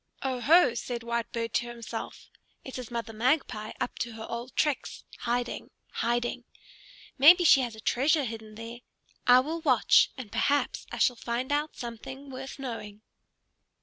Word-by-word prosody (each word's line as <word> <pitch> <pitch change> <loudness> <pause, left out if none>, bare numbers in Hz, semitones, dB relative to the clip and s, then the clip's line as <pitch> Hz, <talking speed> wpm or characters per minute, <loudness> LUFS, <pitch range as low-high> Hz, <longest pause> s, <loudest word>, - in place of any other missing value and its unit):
"Oho!" 265 +3 +4
said 235 0 -4
Whitebird 235 -1 -3
to 240 - 0
himself, 235 -1 -7 0.3
"it 260 -1 -7
is 250 - -7
Mother 230 -2 -4
Magpie 225 -2 0
up - - -3
to 235 0 -3
her 220 0 -7
old 235 +2 -6
tricks, 295 -3 -1 0.2
hiding, 240 0 -2 0.2
hiding. 240 +1 -1 0.8
Maybe 345 +6 +8
she 275 -5 +7
has 240 -3 -3
a - - -12
treasure 280 +7 +2
hidden 220 -3 -7
there. 230 +2 -8 0.5
I 250 +1 +8
will 320 +5 -4
watch, - - +5
and 245 -6 -8
perhaps 285 0 0
I - - -5
shall 245 -3 +3
find 240 +4 -3
out 295 +1 0
something 260 +4 -8
worth 265 +1 -7
knowing." 225 -6 -7
240 Hz, 150 wpm, -28 LUFS, 230-270 Hz, 0.8 s, Maybe